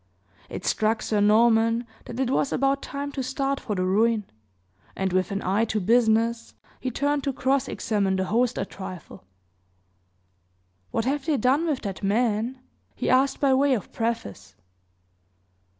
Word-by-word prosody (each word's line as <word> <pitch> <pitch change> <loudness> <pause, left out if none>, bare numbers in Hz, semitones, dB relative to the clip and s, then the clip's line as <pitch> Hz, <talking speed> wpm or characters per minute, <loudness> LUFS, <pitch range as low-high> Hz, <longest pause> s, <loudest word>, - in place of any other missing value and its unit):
It - - -7
struck 215 0 +1
Sir 210 -2 0
Norman 230 +2 +4 0.2
that 240 - -7
it 260 -1 0
was 270 - +1
about 275 +1 +1
time 285 0 -5
to 275 - -4
start 270 +2 -1
for 210 - -4
the 185 -1 0
ruin; 215 +3 +2 0.7
and, 190 -1 -1
with 185 0 +1
an 200 0 -3
eye 195 +4 +1
to 220 -1 -1
business, 230 +2 +2 0.2
he 260 - -2
turned 285 +3 0
to 275 - +1
cross 265 +1 0
examine 200 -3 0
mine 190 0 0
host 235 +4 +1
a - - -1
trifle. 185 - -9 1.7
"What 225 - -1
have 275 +3 -1
they 305 -3 +2
done 270 +8 +2
with 290 -5 -1
that 195 -3 -5
man?" 220 +4 0 0.4
he - - -1
asked 265 +1 +3
by 275 -2 +3
way 270 0 +3
of 210 - -6
preface. 100 - -4
230 Hz, 160 wpm, -25 LUFS, 205-265 Hz, 1.7 s, Norman